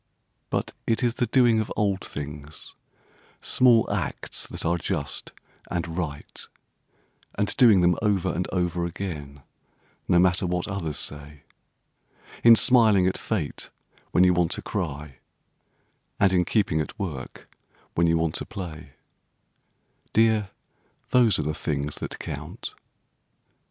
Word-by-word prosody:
But - - -2
it 115 +2 +1
is 120 -1 +2
the 120 - -1
doing 120 -1 +4
of 110 - -3
old 100 -2 0
things, 75 +1 -7 0.7
Small 120 -3 +4
acts - - -2
that - - -5
are 85 +1 +1
just 75 -5 -3 0.4
and 85 -2 -3
right; 75 -5 -5 0.9
And 105 0 0
doing 115 -8 +6
them 90 0 +4
over 95 -5 +1
and 90 +2 -2
over 90 -2 0
again, 75 -7 -7 0.6
no 90 - +4
matter 90 +1 +3
what 90 0 -1
others 90 -7 -3
say; 75 0 -5 1.0
In 115 0 +9
smiling 110 -4 +5
at 95 - +1
fate, 90 -10 -3 0.4
when 90 - +4
you 90 0 +5
want 90 -2 +2
to - - -6
cry, 75 -8 -4 1.0
and 95 -2 +4
in 90 -1 +3
keeping 95 -8 +1
at 75 - -6
work 80 -11 -6 0.5
when 85 0 +2
you 85 0 +3
want 80 -1 0
to - - -4
play— 90 -7 -8 1.2
Dear, 110 -3 +3 0.6
those 120 -4 +5
are 75 - -1
the 75 - -1
things 75 -1 -2
that - - -5
count. - - -7
90 Hz, 135 wpm, -25 LUFS, 75-105 Hz, 1.2 s, In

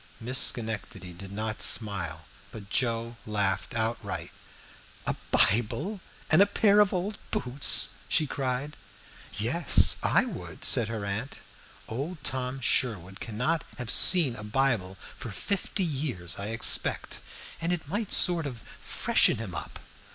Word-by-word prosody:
Miss 125 +3 0
Schenectady 105 -5 -7
did 95 +2 -10
not 110 +1 -4
smile, 85 -8 +1 0.3
but 100 -2 -11
Joe 115 -2 -1
laughed 100 -1 -2
outright. 115 0 -3 0.7
"A - - -1
Bible 120 - +2 0.3
and 160 +4 +6
a 200 - +6
pair 205 0 +3
of 205 -2 +4
old 190 +3 -3
boots!" 125 +3 +4
she 155 - +2
cried. 135 +1 -3 0.6
"Yes, 130 +10 +6
I - - +3
would," - - -7
said 115 - +4
her 110 -2 -5
aunt. 105 +7 -4 0.5
"Old 140 +7 -6
Tom 130 0 -1
Sherwood 100 -7 -1
cannot 125 +9 -2
have 125 -1 -4
seen 155 -4 +3
a 105 - -9
Bible 105 -4 -1
for 120 - -10
fifty 195 - -2
years, 130 - -4
I 100 - -3
expect, 115 +1 +1 0.4
and 165 +1 -1
it 170 -4 -3
might 205 +6 -3
sort 170 -4 +3
of 120 -6 -9 0.2
freshen - - +1
him 105 -5 -7
up." - - -7
120 Hz, 135 wpm, -27 LUFS, 105-150 Hz, 0.7 s, and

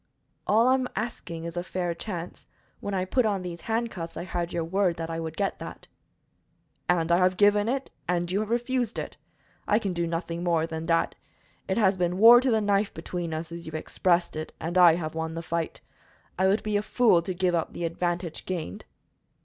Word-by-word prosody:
"All 225 +3 +4
I 260 - +6
am 260 -1 0
asking 180 -7 -4
is 170 0 -6
a 175 - -1
fair 180 -1 -2
chance. 175 -1 -7 0.3
When 200 -1 -3
I 185 -1 0
put 250 +7 +2
on 200 -4 0
these 170 -2 -6
handcuffs 225 -7 -3
I - - -3
had 175 -1 -3
your 170 - -1
word 180 +1 +1
that 165 0 -4
I 165 - -3
would 160 -1 -5
get 200 -1 -1
that." - - -9 1.0
"And 170 -1 +2
I 170 - +6
have 185 0 +3
given 205 +1 +4
it 270 +1 -2 0.2
and 175 0 0
you 195 - +1
have 215 0 -2
refused 240 0 0
it. - - -5 0.5
I 210 - +4
can 200 -4 -1
do 170 -1 -1
nothing 170 0 -3
more 165 -2 +2
than 160 0 -5
that. 165 -1 +2 0.5
It 190 - 0
has 195 -4 +3
been 180 0 0
war 235 +4 +9
to 260 - +1
the 220 -2 +3
knife 205 0 +2
between 170 +1 -4
us, 160 +1 -4
as 170 0 -8
you 160 - -7
expressed 170 +2 0
it, 155 0 -5
and 165 +3 -4
I 175 -3 +7
have 155 -2 -4
won 160 0 -3
the 165 - -4
fight. 170 0 -3 0.5
I 190 +1 +2
would 200 +3 +2
be 210 -1 +1
a - - +1
fool 215 -4 +4
to 185 +2 -3
give 180 0 +1
up 165 -2 -1
the 170 - -3
advantage 170 0 -3
gained." 170 - -4
180 Hz, 215 wpm, -27 LUFS, 170-205 Hz, 1.0 s, war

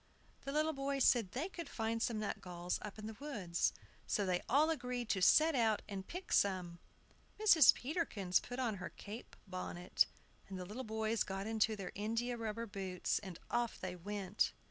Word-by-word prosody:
The 275 - -2
little 310 +2 +2
boys 275 -1 0
said 230 -7 +4
they 285 +8 -1
could 345 -3 -7
find 225 0 -1
some 230 -2 0
nutgalls 180 -4 -3
up 210 -1 -7
in 215 - -7
the 220 0 -6
woods. 205 -13 0 0.4
So 205 - +1
they 180 -1 +1
all 300 +6 +5
agreed 250 -6 -3
to 190 - +1
set 315 - +6
out 225 -5 +2
and 195 -2 -5
pick 365 +2 -5
some. 180 -3 +2 0.6
Mrs. 340 - +8
Peterkins 245 - 0
put 245 - -7
on 235 -6 0
her 185 - -5
cape 215 +4 -9
bonnet, 185 -2 0 0.4
and 190 - -5
the 180 - -5
little 215 +8 -5
boys 220 0 -1
got 195 0 -1
into 220 0 +2
their 195 -3 -5
india 230 +4 -1
rubber 230 0 -3
boots, 195 -4 -2
and 190 -4 -8
off 240 -1 0
they 185 -1 -4
went. 200 +2 -1
220 Hz, 180 wpm, -37 LUFS, 190-250 Hz, 0.6 s, Mrs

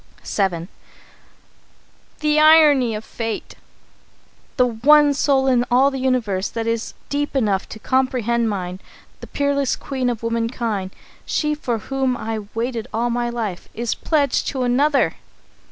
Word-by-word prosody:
VII. 180 -4 -1 1.5
"The 300 0 +2
irony 300 -7 +6
of 215 - -6
Fate! 225 -2 -5 1.0
The 250 - +5
one 285 +5 +4
soul 275 -1 +2
in 250 -2 +3
all 265 +3 +4
the 270 - -4
universe 235 -7 0
that 230 -1 -4
is 230 0 -2
deep 290 0 -2
enough 205 -7 0
to - - -8
comprehend 235 -1 0
mine, 185 -2 -4 0.4
the - - -10
peerless 280 -1 0
queen 260 -3 -2
of 230 -2 -4
womankind, 230 -4 -2 0.3
she 300 -1 -1
for 255 -6 -2
whom 265 +2 -1
I 225 -1 -4
have 215 -2 -5
waited 235 0 -2
all 235 +2 -1
my 240 0 -1
life, 220 -7 -4
is 235 0 -1
pledged 290 -5 0
to 260 -2 -2
another! 275 +4 +2
245 Hz, 140 wpm, -21 LUFS, 225-275 Hz, 1.5 s, irony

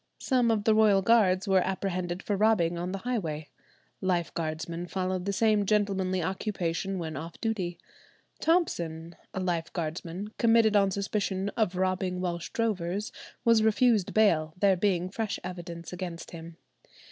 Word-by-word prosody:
Some 250 -3 +2
of 220 -2 +1
the 220 - +4
royal 210 -3 +4
guards 200 -3 +4
were 190 -1 +4
apprehended 185 -1 -2
for 205 - -1
robbing 195 -5 +3
on 175 +2 -3
the 195 - -3
highway. 160 -12 -2 0.5
Lifeguardsmen 170 -1 -2
followed 185 -1 -2
the 200 - 0
same 215 +1 +3
gentlemanly 195 -3 +1
occupation 190 0 -2
when 160 -3 -4
off 165 +4 -7
duty. 190 -7 -2 0.6
Thompson, 170 - 0 0.2
a - - -4
lifeguardsman, 170 +1 -3
committed 225 -2 +4
on 200 -1 +5
suspicion 195 0 -1
of 205 -3 0
robbing 185 0 0
Welsh 175 -2 -3
drovers, 205 -4 -1 0.3
was 230 -1 +5
refused 220 -2 +3
bail, 160 -8 +3
there 195 -1 +4
being 180 -1 +1
fresh 215 +2 -3
evidence 175 -1 -7
against 175 -2 -6
him. 165 0 -9
185 Hz, 140 wpm, -28 LUFS, 170-210 Hz, 0.6 s, on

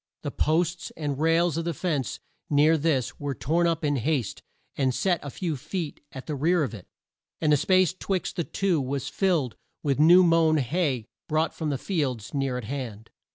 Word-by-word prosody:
The - - -3
posts 170 +2 0
and 145 -3 -3
rails 165 +1 +2
of 165 0 -2
a 170 - -2
fence, 145 -9 -2 0.3
near 150 +2 +5
this, 145 -5 0
were 145 -2 -3
torn 160 +10 +1
up 165 -2 0
in 145 -1 +1
haste, 130 -2 -1 0.3
and 130 -3 +1
set 180 -4 +1
a 145 - -6
few 165 +2 -3
feet 155 +3 -5
at 130 - -8
the 155 - -4
rear 160 +4 +2
of 130 - -3
it, 100 -5 -10 0.5
and 155 -2 +3
the - - +5
space 185 +3 +3
'twixt 185 0 -3
the 175 - 0
two 180 -3 0
was 135 0 -3
filled 170 - 0 0.3
with 140 -2 0
new 175 +4 +8
mown 165 -2 +4
hay 140 -3 0 0.2
brought 155 +1 +1
from 160 -2 -3
the 140 - -1
fields 130 - -2
near 135 -3 -1
at 125 - -5
hand. 115 -3 -6
155 Hz, 195 wpm, -26 LUFS, 135-170 Hz, 0.5 s, new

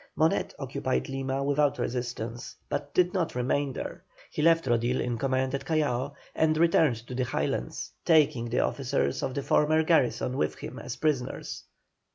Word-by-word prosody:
Monet - - +2
occupied 65 0 -2
Lima 135 0 -2
without 145 0 +2
resistance, 120 -1 -4
but 145 0 -3
did 180 0 +3
not 180 -8 -1
remain 135 +3 0
there. - - -6 0.3
He - - -2
left 165 0 +4
Rodil 120 +1 +1
in 120 -1 -2
command 130 0 0
at 140 - -2
Callao, 145 -3 0 0.2
and 155 -1 +2
returned 160 -5 +4
to 125 - -8
the 125 0 0
Highlands, - - -2
taking 140 -8 +3
the 120 - +2
officers 130 -1 0
of 130 - -2
the 140 - -2
former 155 +2 +3
garrison 135 -5 +2
with 75 - 0
him - - -8
as 125 - -6
prisoners. 145 -5 -2
135 Hz, 165 wpm, -28 LUFS, 125-155 Hz, 0.3 s, left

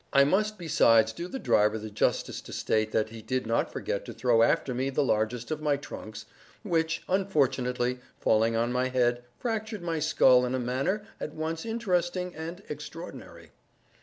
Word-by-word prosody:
I 140 - +6
must 210 +8 +1
besides 115 -9 +4
do 170 +9 -5
the 265 - -5
driver 105 - +2
the 110 0 -7
justice 105 - 0
to - - -11
state 110 0 0
that 110 0 +1
he 115 0 -9
did 130 +3 -2
not 115 +1 0
forget - - -3
to - - -7
throw 120 -2 +3
after 125 +2 +2
me 130 +2 -1
the 135 +2 +1
largest 115 +2 -1
of 155 -1 -2
my 150 -2 +2
trunks, 110 -6 -8 0.4
which, 165 -4 0
unfortunately 130 -9 +1 0.2
falling 115 +1 +3
on 115 +1 +1
my 125 +1 +1
head, 120 -1 +1
fractured 220 -4 -3
my 165 -2 -1
skull 130 -5 +5
in 125 +1 -1
a - - -1
manner 135 - -1
at 150 - -5
once 160 +5 -3
interesting 180 -5 -1
and 165 +5 -7
extraordinary. 150 +4 -9
135 Hz, 175 wpm, -28 LUFS, 120-170 Hz, 0.4 s, I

